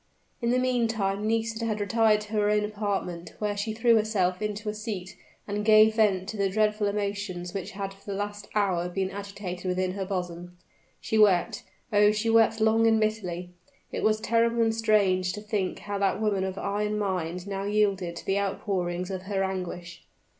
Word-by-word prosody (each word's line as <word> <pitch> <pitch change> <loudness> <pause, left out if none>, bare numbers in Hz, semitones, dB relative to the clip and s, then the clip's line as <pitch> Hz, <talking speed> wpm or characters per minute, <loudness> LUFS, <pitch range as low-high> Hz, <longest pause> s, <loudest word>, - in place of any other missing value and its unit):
In 235 - 0
the 250 - +3
meantime 225 -5 0
Nisida 225 0 -1
had 215 -2 -1
retired 215 0 +3
to 210 +1 -9
her 210 -1 +2
own 210 0 +2
apartment, 200 -5 -3
where 210 -1 -1
she 205 +2 -2
threw 230 +1 +4
herself 200 -4 0
into 210 0 -3
a 210 - -1
seat, 210 -4 -5 0.3
and 205 0 -2
gave 215 0 +6
vent 200 -4 +2
to 220 - -5
the 200 -1 +1
dreadful 210 +1 +1
emotions 200 -3 -3
which 195 -3 -5
had 195 0 -4
for 195 0 -21
the 195 - -2
last 205 0 -4
hour 185 -4 +1
been 190 +1 -2
agitating 200 -2 -5
within 185 0 0
her 195 +1 -3
bosom. 180 -2 -5 0.4
She 220 - 0
wept 205 +1 +4 0.3
oh! 205 0 +6
she 215 +2 0
wept 225 0 +4
long 220 +1 +4
and 225 -1 +4
bitterly: 180 -5 -2 0.4
it - - -3
was 215 0 +2
terrible 230 +1 +2
and 225 0 +2
strange 200 -5 +2
to 210 - -6
think 205 -3 -2
how 205 -1 -4
that 195 0 +1
woman 205 -3 +1
of 190 0 -4
iron 210 +2 -1
mind 180 -3 -2
now 195 0 -3
yielded 200 -4 +1
to - - -9
the 195 +1 +1
outpourings 185 -2 -2
of 190 -1 -4
her 195 -1 0
anguish. 180 -2 -5
205 Hz, 190 wpm, -27 LUFS, 190-215 Hz, 0.4 s, gave